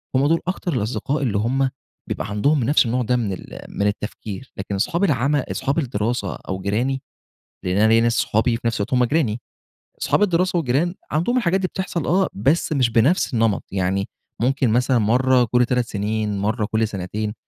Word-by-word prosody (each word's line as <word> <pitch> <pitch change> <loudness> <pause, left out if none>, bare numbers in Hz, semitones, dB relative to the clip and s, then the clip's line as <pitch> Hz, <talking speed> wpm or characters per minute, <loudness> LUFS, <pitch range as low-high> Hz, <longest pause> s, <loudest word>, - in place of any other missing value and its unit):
هم 135 +2 +3
دول 165 +1 +3
أكتر 180 -3 -2
الأصدقاء 130 +6 -1
اللي 105 -5 0
هم 130 +5 +1 0.4
بيبقى 100 - -3
عندهم 130 +7 +2
نفس 140 +1 +4
النوع 125 +2 0
ده 125 +2 +1
من 110 -6 -1
ال - - -9
من 100 - -1
التفكير، 105 +3 -5
لكن 100 +1 -4
أصحاب 170 - 0
العم 145 -3 +2
أصحاب 140 +2 -1
الدراسة 120 -3 -2
أو 95 0 -6
جيراني، 125 +7 -1 0.6
لأن 90 +2 0
أنا 110 +1 +5
ليّا 115 +1 +4
أصحابي 115 0 +1
وفي 115 0 -2
نفس 115 - 0
الوقت 100 - -3
هم 125 -1 +4
جيراني، 120 -5 0 0.6
أصحاب - - +2
الدراسة 180 -1 +1
والجيران، 160 +4 +1 0.2
عندهم 175 +12 +1
الحاجات 190 -4 +2
دي 185 - +1
بتحصل 185 -5 -3
آه، 185 +4 +2
بس 145 +9 +1
مش 130 -4 +2
بنفس 125 +7 +2
النمط، 115 -3 +1
يعني 95 +1 0 0.3
ممكن 130 -1 +2
مثلًا 125 +2 +2
مرّة 125 +3 +3
كل 125 0 +4
3 125 -1 0
سنين، 105 0 -2
مرّة 105 +2 0
كل 110 0 0
سنتين، 105 +2 -4
120 Hz, 180 wpm, -22 LUFS, 105-145 Hz, 0.6 s, أنا